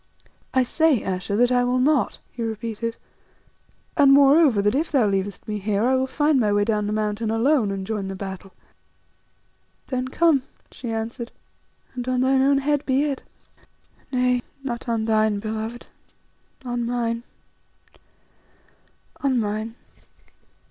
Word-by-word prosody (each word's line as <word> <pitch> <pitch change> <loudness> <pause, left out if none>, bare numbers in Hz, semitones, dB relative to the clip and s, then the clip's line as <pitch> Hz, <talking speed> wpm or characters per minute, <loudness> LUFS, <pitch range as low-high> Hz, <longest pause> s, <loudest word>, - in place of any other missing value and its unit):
"I 260 - +3
say, 310 0 +2
Ayesha, 190 +1 -2
that 245 +3 +3
I 245 0 +3
will 250 +1 +1
not," 280 +2 +2
he 240 - -8
repeated; 225 0 -3 1.0
"moreover, 280 -2 +6
that 205 +1 +2
if 305 +5 -1
thou 265 -7 +3
leavest 195 -1 -2
me 210 -1 -3
here 205 +1 0
I 260 - +3
will 260 0 +1
find 295 +1 +2
my 215 -4 +2
way 205 0 +2
down 210 -2 0
the - - -2
mountain 215 +1 -1
alone, 230 +1 +2
and 195 -1 -4
join 210 -2 -3
the 195 - -5
battle." 190 0 -7 1.4
"Then 255 -1 -2
come," 310 0 +3 0.3
she 245 - -7
answered, 225 +2 -4 0.6
"and 250 -1 -5
on 255 -1 +1
thine 265 +1 +3
own 275 +1 +4
head 290 +1 0
be 265 +1 +1
it. 280 -3 -2 0.9
Nay, 250 -1 +2 0.2
not 240 -2 -4
on 225 -1 0
thine 215 -1 +2
beloved, 220 +3 -5 0.8
on 245 -1 -2
mine, 235 -1 -1 2.0
on 265 -3 +1
mine." 215 +1 -3
235 Hz, 140 wpm, -23 LUFS, 215-265 Hz, 2.0 s, moreover